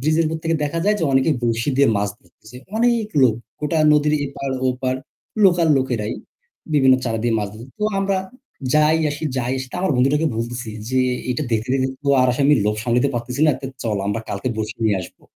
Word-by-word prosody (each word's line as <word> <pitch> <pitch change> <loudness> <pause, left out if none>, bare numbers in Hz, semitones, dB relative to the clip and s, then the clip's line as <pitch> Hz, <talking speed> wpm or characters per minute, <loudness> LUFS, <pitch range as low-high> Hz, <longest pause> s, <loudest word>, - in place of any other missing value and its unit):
bridge 155 +4 +1
এর - - +3
উপর 160 +1 -2
থেকে 165 0 +1
দেখা 155 +3 -2
যায় 210 +1 +3
যে 165 - 0
অনেকেই 135 +4 +3
বরশী 115 +3 0
দিয়ে 140 0 +5
মাছ 100 0 0
ধরতেছে। 110 +7 -17 0.2
অনেক 235 -2 +2
লোক 120 -4 +5 0.3
গোটা 150 +2 0
নদীর 150 0 +3
এপার-ওপার, 130 -2 -2 0.5
local 175 -3 +4
লোকেরাই 120 -5 -2 0.6
বিভিন্ন 135 -3 +6
চারা 115 -2 -1
দিয়ে 120 -1 +1
মাছ 105 -1 -2
ধর 115 +3 -10
তো 210 - -1
আমরা 195 0 +1 0.6
যাই 155 +1 +4
আসি 145 +2 -5
যাই 125 0 -1
আসি 130 - -5
তো - - -11
আমার 185 -4 +1
বন্ধুটাকে 140 +5 +2
বলতেছি 120 0 -4 0.2
যে, 130 +1 +1 0.3
"এইটা 125 +4 -1
দেখতে, 110 0 0
দেখতে 130 0 +1
তো - - 0
আর 130 - +4
আসলে 130 +3 0
আমি 150 - +6
লোভ 105 0 +1
সামলাইতে 125 +3 +1
পারতেছি 120 +3 -3
না। - - +6
তো 135 - -5 0.2
চল 110 -3 -1
আমরা 105 +2 -1
কালকে 130 - -3
বরশী 110 +1 -4
নিয়ে 105 -3 +3
আসবো। 90 - -11
130 Hz, 205 wpm, -21 LUFS, 120-150 Hz, 0.6 s, বিভিন্ন